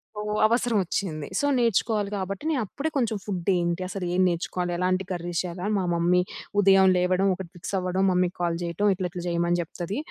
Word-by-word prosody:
So 210 - -4 0.2
అవసరం 235 0 +2
ఒచ్చింది. 165 -5 -3
So 285 - +1
నేర్చుకోవాలి 220 -3 +1
గాబట్టి 195 +7 -4
నేను 280 -6 +1
అప్పుడే 285 +10 -3
కొంచెం 230 -5 +1
ఫూడ్దేంటి? 180 -2 0
అసలు 195 -2 -4
ఏం 185 - +2
నేర్చుకోవాలి? 175 +1 -2
ఎలాంటి 185 +1 +1
కర్రీస్ 175 -1 -2
చేయాలి? 180 0 -6
అని 215 - 0
మా 190 - 0
మమ్మీ 175 +1 +3 0.4
ఉదయం 195 -1 +6
లేవడం 185 +2 +2
ఒకటి 180 -2 -7
ఫిక్స్ 175 - -7
అవ్వడం 185 +1 0
మమ్మీకి 180 0 +1
కాల్ 170 -1 +1
చేయటం 170 +5 0
ఇట్లా 185 -1 -2
ఇట్లా 175 - -6
చేయమని 170 0 +1
చెప్తది 175 - -5
185 Hz, 185 wpm, -26 LUFS, 175-200 Hz, 0.4 s, ఉదయం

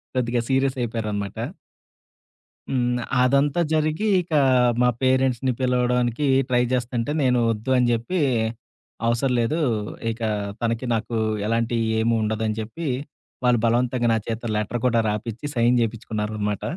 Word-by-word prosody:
కొద్దిగా 120 -1 0
సీరియసయిపోయారనమాట. 115 -7 -1 1.3
హ్మ్. 125 -1 +1 0.3
అదంతా 140 +5 +2
జరిగి 155 +6 +1
ఇక 175 - -14 0.5
మా 125 - +5
పేరెంట్స్‌ని 130 -1 +2
పిలవడానికి 125 0 +1 0.2
ట్రై 125 -1 +3
జేస్తుంటే 125 0 -1
నేను 125 -2 +3
వద్దు 115 +4 -3
అని 125 -1 +3
జెప్పి 120 +11 -1 0.9
అవసర 120 +3 +1
లేదు. 120 +8 0 0.5
ఇక 115 +1 -9 0.4
తనకి 115 +1 -1
నాకు 115 +1 -3 0.3
ఎలాంటి 115 +1 0 0.2
ఏమీ 115 +1 +2
ఉండదని 110 0 -1
చెప్పి 135 +10 -6 0.6
వాళ్ళు 125 -1 +4
బలవంతంగా 120 +1 +1
నా - - +2
చేత్తో 115 +1 -3
లెటర్ 110 +3 -2
కూడా 115 -2 +2
రాపిచ్చి 110 +5 -4
సైన్ 120 +1 +3
జేపిచ్చుకున్నారనమాట. 105 -2 -3
120 Hz, 120 wpm, -23 LUFS, 115-130 Hz, 1.3 s, మా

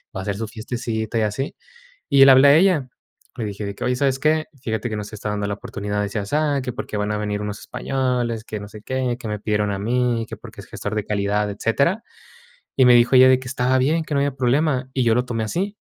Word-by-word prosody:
va 95 - -3
a - - -6
hacer 100 -1 -2
su 115 - -4
fiestecita 110 0 -3
y - - +1
así". 110 +6 -2 0.6
Y 140 -1 +7
le - - +8
hablé 130 +2 +7
a 145 - +7
ella. 165 -7 +3 0.5
Le 120 - -3
dije, 100 0 -5
de 100 - -4
que: - - -6
"Oye, 125 0 +1
¿sabes 135 0 +1
qué?, 155 +2 +1 0.2
fíjate 110 -2 -3
que 110 - -3
no 105 - -4
se 110 - -10
está 105 0 -4
dando 105 -1 -2
la 100 - -2
oportunidad 105 0 -4
de 105 - 0
así, 105 +2 -4
asá, 145 +7 0
que 125 -2 -5
porque 125 -5 -5
van 105 +1 -1
a - - -1
venir 105 -1 -2
unos 105 0 -5
españoles, 125 -3 -2
que 105 -2 -6
no 105 - -8
sé 105 0 -12
qué, 130 0 -2
que 115 - -7
me 105 - -3
pidieron 105 -1 0
a 100 - -2
mí, 120 +1 0
que - - -7
porque - - -12
es - - -12
gestor 105 - -5
de 105 -2 -1
calidad, 105 0 0
etcétera". 140 - 0 0.7
Y 130 - +4
me 125 -1 +7
dijo 120 +2 +4
ella, 130 0 +8
de 130 - +5
que 130 - -10
estaba 125 0 +1
bien, 155 +6 +1
que 155 - -6
no 140 - +2
había 140 -1 0
problema, 130 +1 +1
y 130 - +1
yo 115 -1 +3
lo 125 - +2
tomé 115 -3 -2
así. 195 - -3
120 Hz, 265 wpm, -22 LUFS, 105-130 Hz, 0.7 s, le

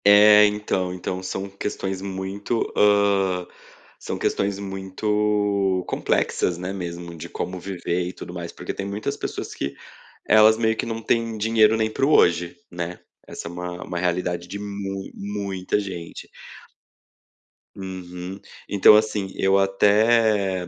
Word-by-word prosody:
É, 105 +1 +8
então. 105 -3 -1
Então 90 0 -4
são 95 +1 -4
questões 95 -1 -4
muito, 100 +4 -3
hã, 100 -3 +3 0.5
são - - -4
questões 100 0 0
muito 100 0 0
complexas, 90 - 0
né, 90 +2 -4
mesmo 85 -2 -6
de 85 +1 -8
como 90 +1 -4
viver 90 -1 -2
e 90 - -6
tudo 90 - -9
mais. 85 -1 -6
Porque - - -6
tem 100 - -5
muitas 100 +2 -3
pessoas - - -5
que 70 0 -4 0.5
elas 110 +1 +6
meio 110 -1 +1
que - - -2
não 115 -1 -4
tem 115 -1 0
dinheiro 110 0 +4
nem 110 0 0
para 135 - +1
o 150 - +2
hoje, 85 0 +3
né. 85 0 -5 0.3
Essa - - -7
é - - -6
uma 90 0 -6
uma 90 - -5
realidade 90 0 -1
de 100 +3 -6
mui 100 -1 -5
muita 100 -1 -2
gente. 90 -5 -7 1.5
Uhum, 95 -1 -7 0.3
então, 100 +1 +7
assim, 105 -2 0
eu 95 0 +3
até 100 -1 +3
95 Hz, 140 wpm, -23 LUFS, 90-105 Hz, 1.5 s, É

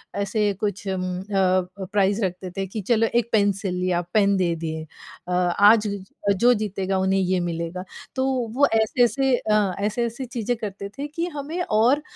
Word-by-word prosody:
ऐसे 200 +2 0 0.2
कुछ 205 -1 -2
उम, 190 -1 -1 0.2
अ 205 +2 -10
अ, 185 0 +1
प्राइज़ 200 +1 +2
रखते 180 0 -5
थे 195 - -2
कि 210 +3 -5
चलो 225 +2 +2
एक 235 -1 +2
पेन्सिल 200 -3 +1
या 175 -1 +1
पेन 200 -2 +4
दे 175 -2 +1
दिए 160 -1 -4 0.4
अ, - - -4
आज 205 +5 +4 0.5
जो 245 +5 +5
जीतेगा 195 -3 -2
उन्हें 190 +1 +2
ये 185 -1 +1
मिलेगा। 170 +1 -3 0.3
तो 260 - +1 0.3
वो 285 +2 +5
ऐसे-ऐसे 245 +4 +3
अ, 210 -4 +1
ऐसे-ऐसी 235 +5 -2
चीज़ें 245 -1 -2
करते 200 -2 -6
थे 285 +1 -3
कि 330 +3 -3
हमें 310 +5 -4
और 240 +4 +3
200 Hz, 170 wpm, -23 LUFS, 185-230 Hz, 0.5 s, जो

